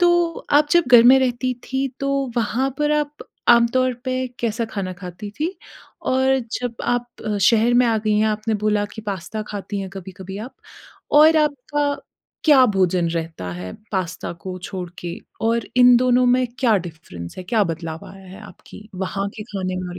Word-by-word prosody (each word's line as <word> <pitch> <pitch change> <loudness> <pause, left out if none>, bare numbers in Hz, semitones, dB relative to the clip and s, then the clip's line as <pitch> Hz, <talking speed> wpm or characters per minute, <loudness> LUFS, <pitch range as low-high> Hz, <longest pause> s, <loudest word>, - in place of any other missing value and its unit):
तो 345 -1 +2
आप 295 +1 +5
जब 345 -2 +5
घर 240 -1 +10
में 260 +2 +8
रहती 255 0 0
थी 265 +1 -1
तो 275 0 0 0.3
वहाँ 240 +4 0
पर 295 0 +1
आप 295 0 -2 0.3
आमतौर 240 +2 +4
पे 255 0 -1
कैसा 230 0 -1
खाना 190 -3 -3
खाती 180 +3 -8
थी 340 +4 -1 0.5
और 265 +1 +3 0.2
जब 245 -2 -3
आप 245 0 0 0.4
शहर 230 +4 +4
में 245 0 +5
आ 225 -1 +2
गई 215 0 0
हैं 215 - +3
आपने 215 +1 -1
बोला 210 -1 +2
कि 220 - -7
पास्ता 205 +1 -4
खाती 205 0 -5
हैं 195 - -5
कभी-कभी 190 0 -9
आप 235 +5 -8 0.7
और 315 +1 +7
आपका 290 -1 0 0.5
क्या 285 -5 +7
भोजन 180 -2 +2
रहता 160 - -4
है 90 +1 -7 0.2
पास्ता 185 -4 -3
को 185 -1 -5
छोड़ 185 -2 -5
के 175 -1 -5 0.3
और 230 0 +1
इन 250 -1 +7
दोनों 250 0 +3
में 250 +1 +3
क्या 235 -5 +4
डिफ़रेंस 155 - -8
है, 185 - -6
क्या 210 +2 +2
बदलाव 165 -1 -5
आया 195 0 -14
है 190 +3 -11
आपकी 210 0 -13
वहाँ 195 +2 -3
के 215 - -5
खाने 190 -4 -4
में 185 0 -4
और 180 0 -7
220 Hz, 180 wpm, -21 LUFS, 185-255 Hz, 0.7 s, घर